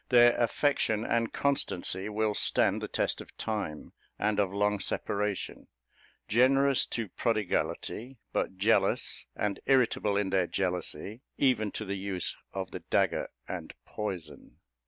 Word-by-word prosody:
Their 120 -1 +7
affection 115 -3 +1
and 115 -1 +1
constancy 100 -8 0
will 110 0 0
stand - - +2
the - - -3
test - - -1
of - - -14
time 100 -9 -4 0.2
and 105 0 +1
of 100 -2 +2
long 105 +1 +1
separation; 100 0 -2 0.6
generous 135 +4 +4
to 115 -4 -3
prodigality, 115 +4 -1 0.2
but 95 - -1
jealous, 110 +4 +2
and 105 -1 -1
irritable 125 -6 +3
in 100 -2 0
their 95 -2 +2
jealousy, 90 +3 -3 0.2
even 120 -6 +2
to 110 - -4
the 100 0 -3
use 95 -2 -1 0.2
of 95 -1 -4
the - - -5
dagger - - +1 0.2
and - - -6
poison. 95 -8 -6
105 Hz, 135 wpm, -30 LUFS, 95-115 Hz, 0.6 s, Their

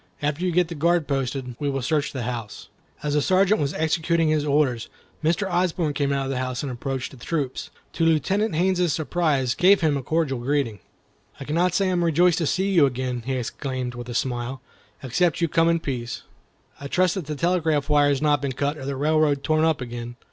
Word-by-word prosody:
After 150 +4 -1
you 180 - +1
get 175 0 +2
the 170 - -6
guard 170 0 +1
posted, 130 -2 -2
we 145 - -1
will 135 -2 -2
search 145 +2 0
the 130 -3 -4
house." 115 -3 -6 0.3
As 145 -1 -1
the 150 - +2
Sergeant 190 +3 +3
was 145 0 -1
executing 160 +1 +1
his 155 -1 +1
orders, 140 -5 +1 0.3
Mr. 170 +6 +1
Osborne 175 -3 0
came 140 -1 0
out 140 -1 0
of 135 - -3
the 130 - -2
house, 130 0 -3
and 140 - -3
approaching 130 +2 -4
the - - -13
troop, 145 -6 -2 0.4
to 165 - -1
Lieutenant 175 +5 +1
Haines's 180 -1 +2
surprise, 150 -6 0
gave 190 +2 +4
him 155 -3 +2
a - - -3
cordial 145 -2 -1
greeting. 125 -4 -1 0.6
"I - - -6
cannot 170 +5 +1
say 195 - +2
I - - +1
am 175 -1 +1
rejoiced 170 +1 +3
to 165 - 0
see 190 +5 0
you 165 -7 +5
again," 125 -1 -3
he 135 - 0
exclaimed, 130 0 -4
with 120 0 -8
a 120 - -5
smile, 125 +1 -2 0.4
"except 160 +6 +1
you 170 - +2
come 165 +1 +3
in 170 0 +2
peace. 125 -6 -4 0.6
I 140 - -6
trust 180 +3 +2
that 180 -7 -5
the 150 - -3
telegraph 160 -3 +1
wire 145 -1 +4
has 140 +1 0
not 145 -1 +3
been 140 -2 -2
cut, 145 +4 -1
or 135 - -7
the 140 - -2
railroad 150 0 +2
torn 155 0 +2
up 160 -4 +2
again." 120 -1 -6
145 Hz, 220 wpm, -24 LUFS, 130-170 Hz, 0.6 s, you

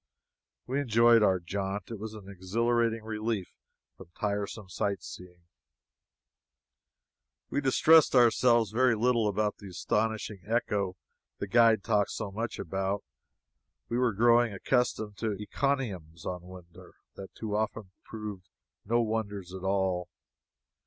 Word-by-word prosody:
We 135 +3 -1
enjoyed 115 -2 +5
our 95 -3 +3
jaunt. 100 +4 -4
It 115 - -6
was 110 +1 -6
an 100 -3 -11
exhilarating 115 +4 0
relief 110 -3 -3 0.4
from - - -14
tiresome 105 0 -3
sight 100 +2 -2
seeing. 90 -1 -11 2.1
We 145 - 0
distressed 150 +3 +5
ourselves 120 -2 +4
very 125 +1 +3
little 115 0 +2
about 105 +1 0
the 100 - -11
astonishing 105 +1 -2
echo 105 -4 -1 0.4
the - - -3
guide 115 +1 +4
talked 105 -3 +1
so 100 - -5
much 115 +4 -4
about. 95 +2 -2 0.9
We 120 - 0
were 125 -3 +2
growing 120 +2 +4
accustomed 110 0 -1
to 110 0 -1
encomiums 105 - -3
on 90 -1 -4
wonders 90 -1 -14 0.2
that 95 - -11
too 105 -2 -4
often 105 -2 -2
proved 105 -4 -8 0.3
no 120 +3 +2
wonders 105 -5 -3
at 95 - -7
all. 95 -2 0
105 Hz, 125 wpm, -29 LUFS, 95-115 Hz, 2.1 s, enjoyed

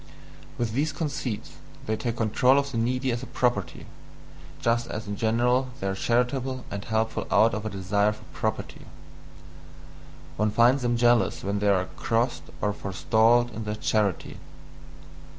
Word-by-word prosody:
With 120 -2 -1
these 145 +5 0
conceits, 140 -8 -4 0.3
they 110 - 0
take 115 +1 -3
control 120 +4 +3
of 140 0 0
the 120 - -3
needy 125 +3 0
as 120 0 -2
a 130 - -7
property, 120 -7 -1 0.7
just 115 0 +1
as 110 +1 -5
in 100 - -3
general 120 +4 +1
they - - -4
are 95 - 0
charitable 125 +4 0
and 100 0 -4
helpful 110 0 -1
out 115 -1 +4
of 105 +1 -3
a - - -2
desire 100 +1 +1
for 105 - -11
property. - - -4 1.5
One 105 +1 +2
finds 120 +5 +4
them 120 -1 +1
jealous 120 0 +3
when 100 +1 -1
they 105 - 0
are 95 -2 +3
crossed 115 +2 0 0.2
or 105 0 +1
forestalled 110 +5 +2
in 110 0 -6
their 105 0 -3
charity. 105 -3 -1
115 Hz, 155 wpm, -26 LUFS, 105-125 Hz, 1.5 s, out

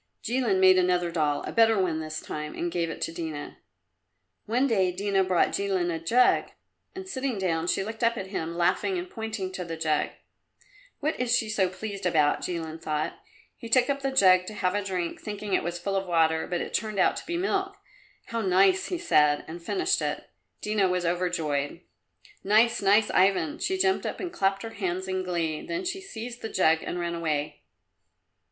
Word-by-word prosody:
Jilin 235 -5 +1
made 185 0 +6
another 180 -1 +1
doll 150 -3 0
a - - -5
better 225 -2 +4
one 170 -4 0
this 155 0 -5
time 150 0 -6
and 175 0 -2
gave 170 -1 -1
it - - -7
to - - -2
Dina. 160 -3 -6 0.9
One 245 +5 +2
day 195 -8 +2
Dina 195 +1 +1
brought 185 -2 +2
Jilin 190 -3 0
a 165 - -3
jug, 240 +10 +3 0.5
and 380 0 -7
sitting 265 - -2
down, 170 -3 -1
she 195 - +1
looked 220 +3 -6
up 230 0 +2
at 195 - -4
him, 170 -3 -4
laughing 180 - +1
and 355 +1 -4
pointing 220 - -5
to 185 -1 -5
the 165 -1 -6
jug. 155 -2 0 0.9
"What 305 +2 -1
is 250 0 +2
she 225 -3 -2
so 195 -4 +1
pleased 195 0 -4
about?" 155 -4 +2
Jilin 165 -2 -4
thought. 155 -1 -2 0.4
He 230 - -9
took 255 +3 +4
up 280 0 -3
the 270 - 0
jug 185 -7 +5
to 215 - -7
have 180 -3 0
a 205 0 -1
drink, 180 -3 -3
thinking 205 -1 -5
it - - +3
was 175 +1 -3
full 195 +3 -3
of 195 -1 -1
water, 160 -2 +2
but 175 -1 -2
it - - -6
turned 215 -2 -2
out - - +3
to - - -7
be 340 0 -2
milk. 390 +2 -1 0.5
"How 230 0 -3
nice!" 190 -1 +3
he 360 - -2
said, 150 - +3
and 170 +2 -8
finished 370 - 0
it. - - -3 0.3
Dina 210 -2 +2
was 180 -1 -1
overjoyed. 165 -5 -1 0.6
"Nice, 220 +4 +3
nice, 205 +2 +4
Ivan!" 200 - +2
She 380 +1 -1
jumped 380 0 +1
up - - -5
and 355 -2 -5
clapped 195 - 0
her 225 - -6
hands 185 -2 -3
in 185 0 -1
glee, 170 -4 -2
then 345 +2 -4
she 370 +2 -3
seized 240 - -8
the 225 - -4
jug 160 -5 +3
and 175 - -4
ran 170 0 -2
away. 150 -3 -2
190 Hz, 200 wpm, -27 LUFS, 170-225 Hz, 0.9 s, made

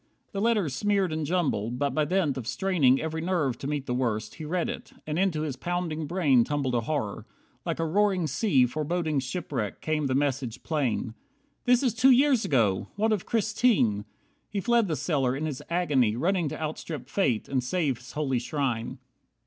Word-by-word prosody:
The 200 - -3
letters 210 - +2
smeared 195 +2 +1
and 155 -2 -2
jumbled, 130 - 0
but 140 +1 0
by 150 +3 +1
dint 165 -3 +1
Of 125 -4 -6
straining 145 -5 +3
every 160 0 -3
nerve 160 -8 0
to 135 - -4
meet 145 -2 -2
the 125 - -2
worst, 115 -4 -1
He 160 - -8
read 175 +3 -1
it, - - -6
and 155 +2 -2
into 180 -5 +1
his 145 -4 -3
pounding 170 -2 -3
brain 145 -9 +3
Tumbled 140 -1 -1
a 120 - +2
horror. 115 -5 -3 0.4
Like - - -1
a 165 - 0
roaring 190 +1 +2
sea 155 - +3
Foreboding 155 +3 -1
shipwreck, 130 - -3
came 155 -2 -1
the 130 - 0
message 130 -3 -1
plain: 130 -7 -1 0.5
"This 250 +1 +4
is 250 -5 +2
two 235 +4 +5
years 260 -2 +5
ago! 110 -9 +1
What 220 +2 +1
of 205 - -3
Christine?" 215 - +2 0.4
He 205 - -2
fled 235 +1 +2
the 160 - -1
cellar, 135 -6 0
in 150 +3 -3
his 150 -4 -4
agony 145 -11 +2
Running 170 +4 +1
to - - -6
outstrip 155 -3 -5
Fate, 135 - 0
and 130 -2 0
save 140 -3 0
his 125 -1 -12
holy 135 -4 0
shrine. 125 -2 -2
150 Hz, 190 wpm, -27 LUFS, 130-180 Hz, 0.5 s, two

